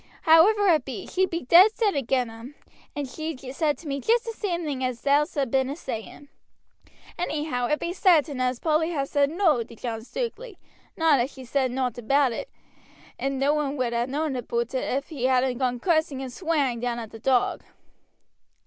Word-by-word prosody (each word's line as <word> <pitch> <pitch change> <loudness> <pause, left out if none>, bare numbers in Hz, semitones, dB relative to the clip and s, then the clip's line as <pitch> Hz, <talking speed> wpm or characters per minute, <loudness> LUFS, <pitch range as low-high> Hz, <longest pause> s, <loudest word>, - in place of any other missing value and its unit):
However 385 +6 +6
it 335 -5 +4
be, - - -6
she 375 0 0
be 340 -1 -3
dead 365 - +6
set 420 -7 +1
agin 255 -2 0
them, 230 +5 -11 0.4
and 290 -2 -3
she's 275 -2 -6
said 300 0 +1
to 330 - -12
me 275 -1 -3
jest 465 - +2
the 460 - -3
same 365 -6 -3
thing 280 -4 -3
as 255 -2 -2
thou'st 285 -2 +1
been 265 -1 +1
a 280 - -4
saying; 265 -1 -7 0.9
anyhow, 300 -7 -2
it 300 - 0
be 345 - -3
sartain 320 -8 +3
as 250 0 0
Polly 320 +1 +1
ha' 275 -2 0
said 280 0 +1
no 325 -6 +2
to 230 - -9
John 225 -1 -5
Stukeley, 470 - -5 0.4
not 320 -4 +4
as 250 +4 -1
she 260 -2 -11
said 260 +1 0
nowt 250 -1 -2
about 275 +3 +2
it, - - -5 0.7
and 275 0 -2
no 275 +2 +2
one 295 -1 -1
would 245 -2 -1
ha' 235 +1 0
known 290 +1 -2
aboot 235 0 -3
it 260 - 0
ef 275 +2 -2
he 280 -6 -3
hadn't 255 -1 +2
gone 250 -2 0
cussing 315 -3 +1
and 255 -2 -7
swearing 290 -7 0
down 240 0 -2
at 225 -2 -7
the 225 - -10
'Dog.' 250 +1 +1
280 Hz, 195 wpm, -25 LUFS, 250-320 Hz, 0.9 s, However